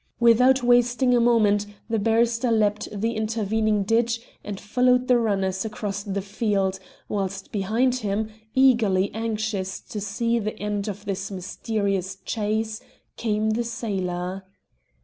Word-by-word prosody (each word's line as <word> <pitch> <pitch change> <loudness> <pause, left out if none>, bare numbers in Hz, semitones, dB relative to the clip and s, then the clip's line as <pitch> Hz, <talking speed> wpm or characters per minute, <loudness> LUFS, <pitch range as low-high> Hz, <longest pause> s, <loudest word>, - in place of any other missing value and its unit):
Without 250 +3 +5
wasting 245 +1 +4
a - - +4
moment 215 -4 +3 0.2
the 225 -1 0
barrister 230 +3 +2
leapt 210 -2 +1
the 215 +2 -1
intervening 215 -1 0
ditch 230 +3 +1 0.2
and 205 -2 -5
followed 250 +4 +2
the 250 -1 +5
runners 195 -4 0
across 210 -2 -4
the 200 -1 -3
field, 200 -2 0 0.3
whilst 195 -1 -3
behind 225 +6 +1
him, 215 -1 -2 0.2
eagerly 230 -8 +4
anxious 215 -4 -2
to 210 - -7
see 230 +4 0
the 215 0 -4
end 205 0 -2
of 205 0 -6
this 195 -1 -3
mysterious 195 0 -2
chase, 220 +1 -2 0.3
came 215 -1 0
the 235 +2 0
sailor. 190 -5 -3
215 Hz, 130 wpm, -24 LUFS, 200-230 Hz, 0.3 s, Without